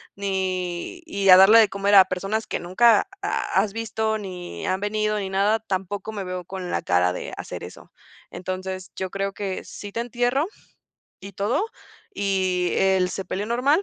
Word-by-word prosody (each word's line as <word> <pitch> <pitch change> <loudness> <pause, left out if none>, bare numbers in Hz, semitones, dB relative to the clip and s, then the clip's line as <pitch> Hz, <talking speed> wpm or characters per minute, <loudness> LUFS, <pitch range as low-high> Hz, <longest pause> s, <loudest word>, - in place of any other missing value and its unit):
ni 190 - -3
y 200 -9 0
a 185 - +11
darle 195 +4 +8
de 215 - +5
comer 200 +1 +2
a 190 -1 +9
personas 195 +4 -2
que - - -2
nunca 210 +5 +4 0.2
ha 190 - +1
has 210 -2 -4
visto 220 -1 -1
ni 180 - -7
han 185 - 0
venido 215 +1 0
ni 195 -1 -4
nada, 200 +3 +3
tampoco 200 +1 -4
me 205 -3 -5
veo 180 -1 -5
con 185 0 -6
la - - 0
cara 90 0 +2
de - - -6
hacer - - -7
eso". - - -11 0.4
"Entonces, 185 0 -5
yo 190 -1 -3
creo 195 0 -3
que 195 -2 -4
sí 205 - -9
te 230 - -2
entierro 245 +4 0 0.8
y 200 - -9
todo, 205 - 0 0.5
y 185 -3 0
el 190 -1 +3
sepelio 195 +1 -4
normal, 265 - +2
195 Hz, 175 wpm, -24 LUFS, 185-215 Hz, 0.8 s, a